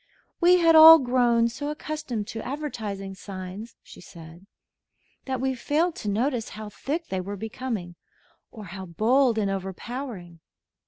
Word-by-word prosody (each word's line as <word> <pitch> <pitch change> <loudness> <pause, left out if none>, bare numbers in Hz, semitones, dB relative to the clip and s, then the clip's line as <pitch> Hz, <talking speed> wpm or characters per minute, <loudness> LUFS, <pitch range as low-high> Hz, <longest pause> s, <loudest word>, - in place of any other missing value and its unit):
"We 360 +1 +5
had 330 -2 +4
all 320 +1 +11
grown 245 -4 +2
so 290 +5 -5
accustomed 300 -7 -5
to 225 - -6
advertising 220 -9 -5
signs," 190 +3 -9
she - - -14
said, 170 +2 -14 0.8
"that 260 -2 -3
we 265 +1 0
failed 305 +7 0
to 210 - -4
notice 235 +3 -1
how 215 0 -8
thick 310 - -5
they 190 -1 -2
were 200 +2 -6
becoming 220 -4 -5 0.6
or 215 -3 -10
how 190 -1 -7
bold 230 +7 +2
and 200 -2 0
overpowering. 195 -1 -6
230 Hz, 145 wpm, -25 LUFS, 195-275 Hz, 0.8 s, all